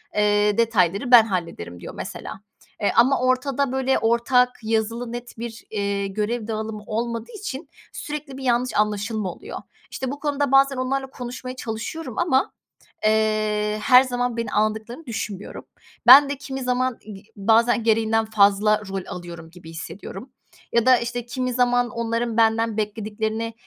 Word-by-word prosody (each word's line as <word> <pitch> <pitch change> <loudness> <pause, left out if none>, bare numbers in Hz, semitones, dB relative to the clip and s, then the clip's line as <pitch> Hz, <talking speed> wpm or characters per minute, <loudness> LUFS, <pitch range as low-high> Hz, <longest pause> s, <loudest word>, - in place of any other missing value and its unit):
eee, 210 0 +2
detayları 220 0 +1
ben 235 -2 +10
hallederim." 165 - -4
diyor - - -9
mesela. - - -7 0.4
E, 205 - +1
ama 270 +3 +4
ortada 255 +1 +1
böyle 265 0 +1
ortak 235 +2 +3
yazılı 225 +2 -1
net 240 -1 -8
bir, 230 -1 -7
iii, 200 -2 -2
görev 215 +2 -2
dağılımı 220 -1 -4
olmadığı 230 +1 -3
için 290 -6 -6 0.2
sürekli 295 -3 -6
bir 270 - -8
yanlış 245 0 +1
anlaşılma 210 -1 -1
oluyor. - - -8 0.3
İşte, 260 0 -4
bu 285 - -6
konuda 285 -2 -1
bazen 275 0 +5
onlarla 265 +1 -1
konuşmaya 255 0 -7
çalışıyorum 245 +7 -6
ama, 295 -7 +1 0.5
eee, 215 -1 +1
her 255 +1 +7
zaman 245 -2 -2
beni 230 - -3
alındıklarını 220 +7 -1
düşünmüyorum. 210 -4 -6 0.4
Ben 280 +1 +10
de 280 - -3
kimi 270 -1 -6
zaman 250 0 0
gi 210 -1 -11
bazen 225 +3 +3
gereğinden 225 0 +2
fazla 210 0 +3
rol 195 -1 -4
alıyorum 170 -2 -8
gibi 175 -2 -13
hissediyorum 195 +8 -8 0.4
ya 235 0 +2
da, 255 -1 +6
işte, 240 0 -4
kimi 255 +1 -3
zaman 245 0 +2
onların 230 0 -2
benden 225 -1 +2
beklediklerini, 220 +1 -3
230 Hz, 145 wpm, -23 LUFS, 210-255 Hz, 0.5 s, ben